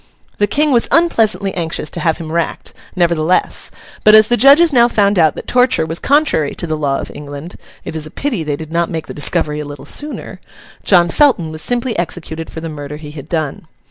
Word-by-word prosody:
The 205 - +3
King 295 +7 +1
was 240 -3 +3
unpleasantly 225 - +2
anxious 165 -3 -2
to - - -4
have 160 -2 0
him 160 -2 -7
racked, 170 0 -3 0.2
nevertheless; 170 -1 +1 0.3
but 215 0 +7
as 215 0 +6
the 240 - +4
judges 280 +7 +6
now 240 -2 +5
found 200 -4 +2
out 155 -3 +3
that - - -7
torture 250 -10 +2
was 165 +1 -3
contrary 280 - +1
to - - -4
the 155 -2 -2
law 140 -3 -1
of - - -7
England—it 145 +3 -10
is 155 -1 -5
a - - -10
pity 235 - -3
they 150 -2 -2
did 155 +1 -9
not 170 0 0
make 160 -2 -4
the - - -8
discovery 150 +1 -1
a - - -3
little 145 -1 -9
sooner—John 190 - -1
Felton 195 - +2
was 155 0 -7
simply 245 +1 -1
executed 165 -2 -5
for 160 - -8
the 165 - -5
murder 150 -1 -7
he 150 -1 -10
had 150 0 -10
done. 155 -2 -3
170 Hz, 205 wpm, -16 LUFS, 155-225 Hz, 0.3 s, but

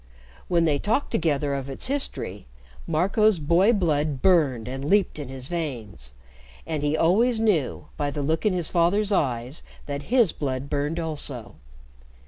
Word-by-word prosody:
When 170 -2 +2
they 145 -3 +2
talked 225 - 0
together 145 -3 0
of 135 -1 -4
its 135 - -5
history, 255 - -3 0.4
Marco's 195 +6 +3
boy 170 +8 +3
blood 155 - 0
burned 145 -11 +3
and 135 +2 -5
leaped 195 +1 +2
in 145 - -5
his 130 -1 -4
veins, 120 - -5 0.5
and 155 -3 -3
he 145 +1 +1
always 220 +9 +3
knew, 195 - +1
by 145 -1 -1
the 145 0 -3
look 160 +3 0
in 215 - +3
his 175 -3 -1
father's 190 +5 +2
eyes, 130 -5 -1 0.2
that 145 0 -6
his 235 -7 +4
blood 135 -1 -4
burned 145 +3 -1
also. 145 -7 -4
155 Hz, 155 wpm, -25 LUFS, 140-185 Hz, 0.5 s, his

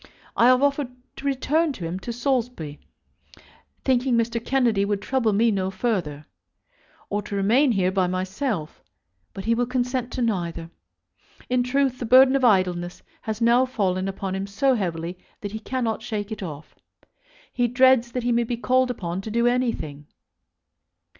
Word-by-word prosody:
I 235 - +5
have 255 +1 +5
offered 285 -1 +1 0.3
to 280 - -4
return 300 +4 +1
with 280 - -4
him 175 +1 -4
to 235 - -5
Saulsby, 240 - -2 1.1
thinking 255 -2 +2
that 230 - +4
Mr. 230 -1 -3
Kennedy 240 -7 +2
would 200 0 -1
trouble 230 +1 0
me 225 +3 +3
no 190 -2 -1
further, 190 -8 -2 0.9
or 205 +1 0
to 205 0 -6
remain 235 +7 +3
here 185 -2 +1
by 190 -1 +1
myself; 185 - -3 0.5
but 195 -1 -8
he 230 - +3
will 240 +1 0
consent 250 0 -1
to 250 - -1
neither. 170 -6 -2 0.8
In 250 0 +2
truth 255 0 0
the 240 - -4
burden 260 +2 +7
of 270 - +1
idleness 180 -5 +1 0.2
has 220 +1 -4
now 235 +2 +5
fallen 190 -6 -1
upon 195 0 -4
him 195 +1 -3
so 240 +7 +2
heavily 175 -4 -3 0.2
that 205 - -5
he 220 - -5
cannot 230 -2 -2
shake 215 -2 -4
it 220 - -5
off. 155 -4 -8 0.8
He 245 -1 +1
dreads 245 -1 +4
that 250 - -2
he 245 - +1
may 235 0 +2
be 235 +1 -3
called 255 +2 +2
upon 180 -6 -4
to 220 - -7
do 235 +2 +1
anything. 230 - -1
230 Hz, 170 wpm, -24 LUFS, 190-250 Hz, 1.1 s, burden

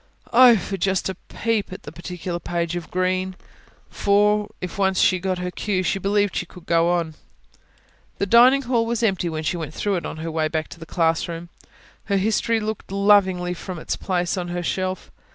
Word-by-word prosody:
Oh, 245 -1 +8
for 195 +1 -4
just 190 +1 0
a 190 - -4
peep 225 -4 -1
at 190 +3 -8
the 145 - -8
particular 175 +1 -5
page 170 -1 -2
of 175 -2 -5
Green! 185 +1 -1 0.6
For, 210 +1 +2
if 180 +2 -6
once 190 -1 +2
she 185 - +4
got 185 0 -1
her 180 0 -3
cue, 190 -1 -1
she 195 - 0
believed 205 +1 +1
she - - -2
could 180 -2 -14
go 170 -1 +3
on. 170 -2 0 1.0
The - - 0
dining 245 +6 +6
hall 235 -2 +1
was 235 0 -1
empty 190 -5 +1
when 160 -1 -4
she 175 - -1
went 155 -2 -6
through 200 -2 0
it 170 - -5
on - - -7
her 165 +1 -4
way 160 -1 0
back 155 0 -3
to - - -11
the 165 - -10
classroom: 165 0 -1 0.6
her 200 -1 +1
history 220 +3 +1
looked 215 -2 -5
lovingly 195 -3 +3
at 180 - -5
her - - -10
from 185 -2 -5
its 160 - -3
place 180 0 -1
on 180 -1 -3
the 175 0 -3
shelf. 185 +1 -3
185 Hz, 205 wpm, -23 LUFS, 175-205 Hz, 1.0 s, Oh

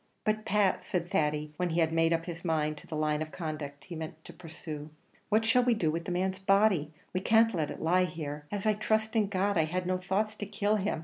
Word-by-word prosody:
"But, 215 0 0
Pat," 200 -3 +2
said 175 -1 -2
Thady, 150 0 0
when 180 -1 0
he 165 +1 0
had 160 -1 +2
made 165 0 +3
up 165 0 +1
his 170 -1 -6
mind 155 -3 0
to - - -13
the 160 - -5
line 155 0 0
of 155 0 -4
conduct 150 -4 -5
he 175 - -8
meant 160 0 -7
to - - -10
pursue, 160 -3 -8 0.4
"what 215 +1 +3
shall 250 +3 +4
we 240 -1 +3
do 165 -7 +1
with 165 +1 -3
the - - -3
man's 190 +2 -1
body? 195 -5 +3 0.2
We 185 - +1
can't 225 +3 +4
let 155 -5 -1
it - - -6
lie 180 +3 +4
here. 150 -4 -6
As 205 0 -3
I 215 - +4
trust 220 +1 0
in 215 -2 +3
God, 195 -1 +1
I 160 - +3
had 180 +3 -2
no 185 0 0
thoughts 195 +3 0
to 205 - -5
kill 205 +1 +1
him! 195 -4 -1
180 Hz, 250 wpm, -30 LUFS, 155-205 Hz, 0.4 s, shall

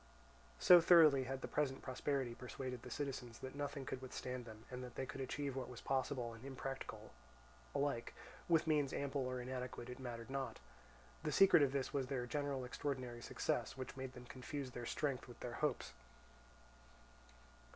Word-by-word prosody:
So 175 - +9
thoroughly 155 -6 +8
had 135 +1 -3
the - - -3
present 135 -3 0
prosperity 130 -1 -1
persuaded 125 0 -5
the - - -8
citizens 135 -5 -3
that 130 - -6
nothing 140 -1 -3
could 130 -2 -4
withstand 125 -1 -4
them, 110 -1 -10
and 125 0 -4
that 125 -1 -8
they 135 - -2
could 135 - -6
achieve 140 +1 -2
what 130 -1 -3
was 125 -2 -8
possible 130 -3 0
and 115 +1 -11
impracticable 135 0 -5 0.6
alike, 140 -4 0 0.3
with 165 -2 +5
means 150 -4 +2
ample 140 -1 0
or 130 0 -2
inadequate 125 -1 -4
it 125 - -8
mattered 120 -1 -5
not. 135 -4 -2 0.6
The 155 -1 -1
secret 190 +1 +8
of 140 -2 +4
this 135 -1 -1
was 135 -2 0
their 130 -2 -1
general 140 0 -1
extraordinary 125 -2 -3
success, - - -1
which 130 -1 -5
made 130 -1 -5
them 125 -1 -10
confuse 130 +2 -5
their 120 -1 -5
strength 140 -4 -1
with 120 -1 -11
their 120 - -4
hopes. 145 - 0
130 Hz, 170 wpm, -39 LUFS, 125-140 Hz, 0.6 s, So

